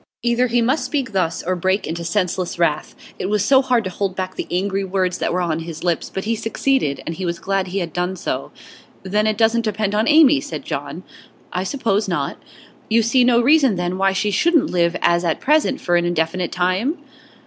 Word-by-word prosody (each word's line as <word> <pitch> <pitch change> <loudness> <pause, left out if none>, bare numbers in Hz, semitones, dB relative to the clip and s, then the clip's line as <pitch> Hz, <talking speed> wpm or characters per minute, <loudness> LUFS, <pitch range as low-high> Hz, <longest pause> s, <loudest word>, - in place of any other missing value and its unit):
Either 240 +1 +2
he 240 0 +1
must 265 +6 +1
speak 270 -6 -2
thus, 185 -4 -1
or 185 +2 -1
break 190 +3 0
into 170 +2 -4
senseless 180 0 -1
wrath. 165 -3 0 0.2
It - - -2
was 210 0 0
hard 260 -4 +3
to 185 - -3
hold 190 0 -3
back 185 0 -4
the - - -5
angry 195 +2 -1
words 185 -1 -1
that - - -1
were 180 - 0
on 165 -2 -1
his 165 -1 -7
lips, 175 -2 -1
but 190 - -4
he 230 +2 0
succeeded, 225 - -1
and 165 - -3
he 185 - -6
was 170 -1 -2
glad 195 +1 -1
he 185 +2 -4
had 170 -5 -3
done 180 +1 -2
so. - - -4 0.5
'Then 210 +3 0
it 215 -1 0
doesn't 230 +1 +3
depend 215 -2 -2
on 215 +2 +1
Amy,' 300 -2 +6
said - - -7
John. - - -5 0.5
'I 180 - -1
suppose 220 -4 0
not.' 175 -2 -3 0.5
'You 225 +1 +3
see 245 +3 +3
no 240 -1 +4
reason, 270 -3 +4
then, 175 +1 -2
why 195 0 +3
she 195 +2 -1
shouldn't 315 - +2
live 170 -1 +1
as 170 0 +3
at 165 -2 0
present 300 -1 +2
for 175 - 0
an 175 0 +2
indefinite 175 +1 -1
time? 185 - 0
195 Hz, 215 wpm, -20 LUFS, 180-235 Hz, 0.5 s, Amy